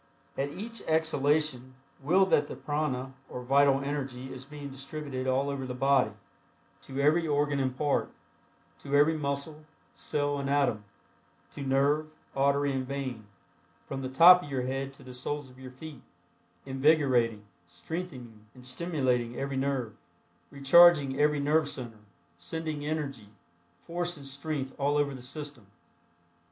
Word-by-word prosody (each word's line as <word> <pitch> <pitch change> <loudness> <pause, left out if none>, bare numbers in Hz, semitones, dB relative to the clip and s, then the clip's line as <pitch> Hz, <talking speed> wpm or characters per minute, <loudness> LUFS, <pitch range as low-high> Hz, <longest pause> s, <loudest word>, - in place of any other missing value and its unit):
At 140 +1 -1
each 215 +7 -6
exhalation 150 -4 +1 0.3
will 180 +8 +4
that 150 -6 +2
the - - -7
prana 135 -3 -2 0.2
or 125 - -6
vital 135 +1 +4
energy 135 -2 -4
is 130 0 -8
being 145 -1 -8
distributed 135 -1 -5
all 130 +2 +1
over 140 -2 -3
the 125 - -5
body, 135 -2 +3 0.7
to 135 0 -7
every 155 +4 +3
organ 145 -1 +1
and 130 -1 -1
part; 145 -2 +1 0.7
to 140 0 -2
every 150 +3 +5
muscle, 150 +1 -4 0.3
cell 145 -1 -1
and 140 0 -3
atom; 135 -7 +1 0.7
to - - -8
nerve, 140 +3 +1 0.3
artery 140 +1 +2
and 130 -1 -2
vein; 130 -6 -5 0.6
from 135 0 -5
the 130 - -4
top 175 +7 +8
of 145 - -9
your 130 -2 -1
head 135 +1 -3
to - - -15
the 130 - -10
soles 135 +2 -4
of 125 - -18
your 130 -1 -9
feet; 140 +1 -10 0.6
invigorating, 130 -6 +2 0.2
strengthening 120 - -7
and 125 -1 -12
stimulating 130 -5 -1
every 140 0 -3
nerve; 130 -5 -1 0.5
recharging 140 0 +6
every 150 0 +3
nerve 150 +1 +2
center; 120 -6 -7 0.4
sending 155 - -4
energy, 145 -8 -4 0.5
force 175 0 -2
and 140 - -10
strength 140 0 -3
all 145 +1 +2
over 145 -1 +1
the 130 - -9
system. 140 -4 -8
140 Hz, 145 wpm, -29 LUFS, 130-150 Hz, 0.7 s, top